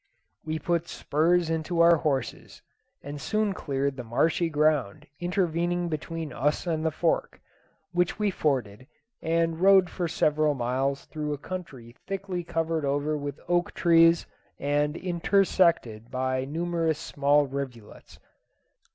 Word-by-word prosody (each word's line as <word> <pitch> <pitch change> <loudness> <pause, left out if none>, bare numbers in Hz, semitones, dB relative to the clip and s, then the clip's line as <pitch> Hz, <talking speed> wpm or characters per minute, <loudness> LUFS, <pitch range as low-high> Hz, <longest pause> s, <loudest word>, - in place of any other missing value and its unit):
We 155 0 -3
put 170 +2 -1
spurs 165 +3 +1
into 165 +2 -2
our 170 0 +7
horses, 145 -4 -3 0.4
and 145 0 -7
soon 215 +2 0
cleared 140 -4 -2
the 125 - -5
marshy 160 +8 +1
ground 150 -8 +1
intervening 175 -1 0
between 160 -1 -4
us 150 +6 0
and 160 -2 -1
the 160 - +2
Fork, - - -1 0.5
which 175 -1 0
we 210 -1 +1
forded, 130 - -2 0.3
and 165 0 0
rode 190 -1 +5
for 175 -2 -2
several 155 -2 +1
miles 135 +3 -1
through 150 -1 -4
a - - -4
country 140 -7 -8
thickly 195 -2 -3
covered 165 -1 -1
over 145 +2 0
with 145 -1 -5
oak 175 0 0
trees 165 -1 +5 0.3
and 145 +2 0
intersected 170 - +1
by 130 0 -1
numerous 165 +1 -1
small 145 0 +2
rivulets. 130 -5 -7
160 Hz, 130 wpm, -27 LUFS, 140-175 Hz, 0.5 s, our